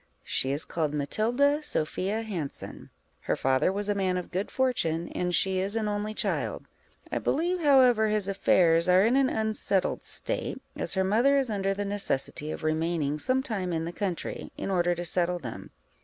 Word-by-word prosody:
_ - - -37 0.2
She 130 - -1
is 145 +3 -2
called 155 -3 -2
Matilda 245 - +1
Sophia 200 - -1
Hanson: 175 -10 -6 0.3
her - - -1
father 130 +6 +2
was 205 +1 +1
a 205 - +2
man 190 -2 0
of 180 - -6
good 190 +4 -2
fortune, 170 -11 0
and 180 0 -2
she 190 -1 +2
is 195 +3 0
an 220 -2 0
only 210 +1 -2
child; - - -2 0.5
I - - 0
believe, 350 +4 0
however, 255 -7 +5
his 210 -2 +1
affairs 175 -3 +3
are 185 +2 +6
in 235 +3 +3
an 270 -1 +3
unsettled 215 -4 0
state, - - -3 0.2
as - - -2
her 190 - +2
mother 235 +9 +3
is 265 -4 +1
under 195 -1 0
the 205 +1 -3
necessity 175 -7 -1
of - - -6
remaining 155 -2 0
some 260 - +1
time 195 -8 -3
in 165 -1 -1
the 170 - -4
country, 190 -4 -4
in - - -3
order 175 -1 +2
to 175 +1 -4
settle 175 +1 +1
them. 125 -9 -8
195 Hz, 185 wpm, -28 LUFS, 170-220 Hz, 0.5 s, are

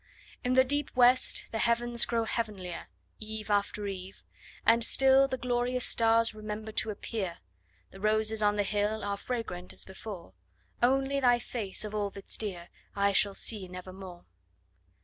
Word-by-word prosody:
In 250 0 +1
the 260 - +7
deep 285 +2 -1
West 250 +1 +4
the 225 - -2
heavens 235 +1 +2
grow 230 -1 0
heavenlier, 210 -6 -4 0.3
Eve 215 0 -6
after 205 0 0
eve; 190 -1 -7 0.4
and 230 +1 +5
still 270 +3 +5
The 260 - -3
glorious 250 0 0
stars 230 0 +3
remember 215 0 -6
to 215 - +2
appear; 200 -3 -4 0.5
The 195 - -12
roses 215 +1 +2
on 205 0 +3
the 205 - +1
hill 210 +1 -1
Are 200 0 -1
fragrant 200 -5 -5
as - - -6
before: 190 - -9 0.5
Only 270 +3 +2
thy 245 -2 +4
face, 220 -4 -4
of 210 - -6
all 205 -1 -1
that's 200 0 -7
dear, 180 -5 -5 0.3
I 200 0 +3
shall 200 0 +2
see 205 -5 0
nevermore! 180 0 -10
215 Hz, 155 wpm, -30 LUFS, 200-240 Hz, 0.5 s, the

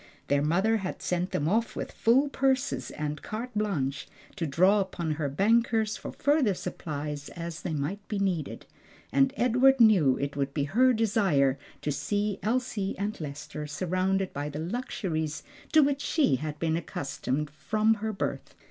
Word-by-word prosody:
Their 140 0 +3
mother 190 +9 +2
had 190 -3 -4
sent 180 +1 0
them 145 - -1
off 225 +6 +1
with - - -4
full 255 +6 +3
purses 270 -1 0
and 150 -1 -4
carte 235 +4 -5
blanche 160 -11 -1 0.3
to 170 -4 -2
draw 185 +8 +4
upon 180 -4 -2
her 150 -2 -1
bankers 220 - +2
for - - -7
further 285 -8 +2
supplies 145 -3 -5
as 170 -1 -6
they 165 - -3
might 185 +9 -3
be 210 - -2
needed; 185 -6 -2 0.5
and 270 -1 +4
Edward 250 +2 +4
knew 190 - +6
it 140 0 -3
would 140 -1 -2
be 145 - +1
her 245 - +4
desire 195 - +2 0.2
to 150 - 0
see 205 +8 -1
Elsie 220 -3 -1
and 205 -1 -3
Lester 150 +1 -6
surrounded 185 +5 -1
by 145 +1 -3
the 145 - -6
luxuries 160 - -3 0.3
to 310 - +7
which 280 0 +1
she 290 - +2
had 150 +2 -5
been 160 +1 0
accustomed 145 -2 -3
from 215 +10 +1
her 220 0 -3
birth. 195 - -4
185 Hz, 165 wpm, -28 LUFS, 150-220 Hz, 0.5 s, to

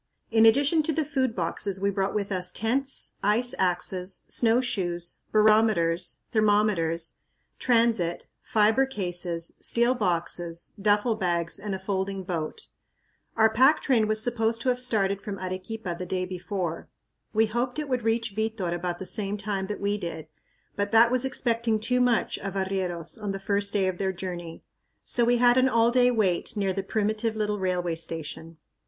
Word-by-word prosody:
In 225 0 +6
addition 285 +7 +4
to 310 - -1
the 315 0 0
food 260 -5 -1
boxes 190 +2 -2
we 200 +1 +1
brought 195 0 -1
with 205 -1 -2
us 180 -1 0
tents, 265 +5 -1
ice 230 +5 +3
axes, 180 +1 -1
snowshoes, 195 -8 0
barometers, 215 -6 +3
thermometers, 205 -7 +1 0.4
transit, 230 -8 +1 0.2
fiber 220 +5 +2
cases, 175 -7 -3
steel 235 +2 +2
boxes, 175 -5 -2
duffle 210 +3 +2
bags, 170 -2 -1
and 200 -1 -4
a - - -6
folding 190 0 -3
boat. 170 -4 -4 0.7
Our 220 0 +5
pack 265 +7 +5
train 230 -6 +2
was 215 0 +1
supposed 230 -1 0
to 255 - 0
have 250 0 0
started 200 -5 +1
from 200 -1 -6
Arequipa 185 +1 -5
the 180 - -5
day 185 0 -2
before. 180 -2 -4 0.4
We 220 +1 +3
hoped 240 +4 -2
it 300 -1 -3
would 255 -2 -1
reach 225 -1 -1
Vitor 220 -5 -2
about 175 0 -3
the 190 - -7
same 205 0 -1
time 200 -2 -3
that 210 - -5
we 205 +1 -1
did, 165 -4 -6 0.5
but 205 0 -2
that 230 +1 +6
was 255 +1 +2
expecting 235 -3 0
too 250 +3 +1
much 245 -3 +1
of 195 -1 -6
arrieros 190 0 -3
on 205 -2 -3
the 195 - -5
first 200 +1 0
day 195 -3 +1
of 185 -1 -3
their 190 -1 0
journey. 175 -3 -7 0.4
So 240 - +1
we 240 +1 +3
had 245 +1 +4
an 260 +1 +4
all 230 -1 +3
day 250 0 +4
wait 215 -1 0
near 195 -2 0
the 195 - -2
primitive 215 +2 -1
little 210 -1 -1
railway 180 -2 -1
station. 165 0 -6
205 Hz, 170 wpm, -26 LUFS, 185-230 Hz, 0.7 s, In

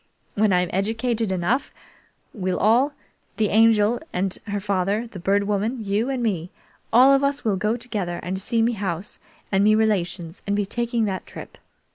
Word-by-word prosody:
When 210 0 +2
I'm 180 -1 +1
educated 225 +2 -1
enough, 190 +9 0 0.6
we'll 185 -3 -2
all 245 +8 +3 0.4
the 215 -2 +1
Angel 220 +1 +4
and 185 +1 -1
her 205 0 -2
father, 200 +2 0
the 220 -5 -10
Bird 200 +3 +1
Woman, 210 +3 -2
you, 205 +5 0
and 260 -3 -2
me 180 -6 -1 0.4
all 255 +4 +7
of 275 0 +3
us 280 -1 0
will 210 -3 +2
go 210 +4 0
together 205 -8 -4
and 190 +2 -3
see 230 +3 +1
me 235 - +2
house 195 -3 -4 0.3
and 195 0 +3
me 215 +1 +5
relations 185 -5 -1
and 200 - +1
be 205 -1 0
taking 235 +2 -1
that 190 -2 -4
trip. - - -10
210 Hz, 175 wpm, -23 LUFS, 190-230 Hz, 0.6 s, all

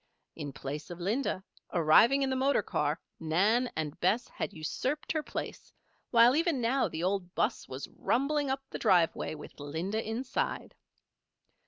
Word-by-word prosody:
In 145 -3 -5
place 140 +3 -6
of 175 0 -7
Linda, 200 +1 -1 0.3
arriving 200 - +5
in 265 - 0
the - - +1
motor 270 +2 +2
car, - - -1 0.2
Nan 200 +10 +2
and 155 -2 -3
Bess 225 +7 +2
had - - -4
usurped 255 - -3
her 315 - 0
place; - - -6 0.4
while 235 +2 +6
even 330 -3 +2
now 245 +1 +2
the 160 -1 -5
old 185 -1 -1
'bus - - 0
was 130 +2 -6
rumbling 280 +3 0
up 270 0 -1
the - - -5
driveway 170 -3 +2
with 150 - -11
Linda 165 +10 -3
inside. 235 +4 -3
210 Hz, 155 wpm, -31 LUFS, 160-265 Hz, 0.4 s, while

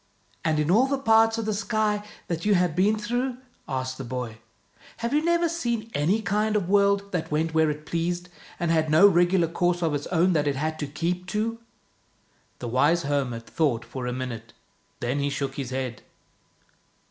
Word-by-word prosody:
" - - -37
And 160 -1 +1
in 150 +2 +1
all 240 +7 +5
the 275 0 0
parts 225 -3 +4
of 225 - -2
the 215 - 0
sky 210 0 0 0.2
that 170 -1 -3
you 210 -1 +3
have 180 -3 +1
been 205 +4 +3
through," 245 +4 -2 0.3
asked 130 -1 -3
the - - -4
boy, 120 -3 -5 0.6
"have 235 +2 -2
you 300 +1 +2
never 340 0 +2
seen 235 -9 -2
any 180 +10 +1
kind 210 +3 +1
of 200 -4 0
world 200 0 +2
that 180 -3 -2
went 160 +2 0
where 160 -1 +3
it 150 0 -5
pleased, 175 +2 -2 0.3
and 170 -1 0
had 160 -1 +2
no 160 +6 +7
regular 175 -1 +3
course 175 +1 0
of 160 -2 +1
its 145 0 -2
own 180 +1 +2
that 150 -2 +1
it 140 - +1
had 155 +3 -2
to 145 - -2
keep 175 +5 -3
to? 220 +3 -2 0.5
" - - -39
The 120 - -6
wise 145 +8 +2
hermit 130 -5 -1
thought 135 -8 0
for 130 -2 -5
a - - -1
minute, 120 -3 -5 0.5
then 125 +4 -1
he 140 0 0
shook 140 -1 -3
his 135 -3 -5
head. 130 -3 -4
170 Hz, 200 wpm, -26 LUFS, 145-210 Hz, 0.6 s, no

